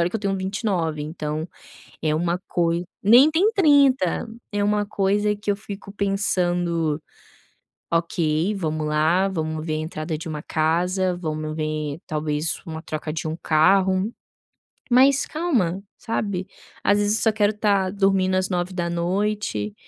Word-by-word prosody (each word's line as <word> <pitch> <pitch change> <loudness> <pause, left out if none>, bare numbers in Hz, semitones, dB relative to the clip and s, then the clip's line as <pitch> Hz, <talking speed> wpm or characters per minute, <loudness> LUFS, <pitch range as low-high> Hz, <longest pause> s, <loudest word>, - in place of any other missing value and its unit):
olha 170 +1 +2
que 225 - -1
eu - - -8
tenho 195 -2 -1
29, 190 -5 -2
então 155 +1 -4 0.5
é 155 -1 +1
uma 170 +2 0
coisa 170 0 0 0.2
nem 245 +9 +7
tem 380 +7 +3
30, 285 - +3 0.2
é 205 0 0
uma 205 0 +1
coisa 205 +1 +1
que 205 0 -3
eu 200 - +1
fico 200 -1 -9
pensando: 175 -5 0 0.9
"Ok, 165 +2 0
vamos 155 -4 -2
lá, 160 +6 +2
vamos 160 -3 -3
ver 155 - -1
a - - -1
entrada 155 0 -4
de 165 - -7
uma 150 -1 -5
casa, 180 +3 0
vamos 155 -2 -4
ver 155 -1 -3
talvez 150 0 -1
uma 160 -1 -5
troca 155 0 -4
de 160 0 -4
um 160 +1 -3
carro", 190 +6 +3 0.8
mas 265 +3 +5
calma, 225 - -1
sabe? 200 -5 -3 0.4
Às 205 - +3
vezes 205 +1 +2
eu - - -3
só 220 - +4
quero 210 -1 +3
estar 200 -3 +1
dormindo 195 -1 +2
às 185 +1 0
21h 175 - -1
180 Hz, 150 wpm, -23 LUFS, 160-205 Hz, 0.9 s, nem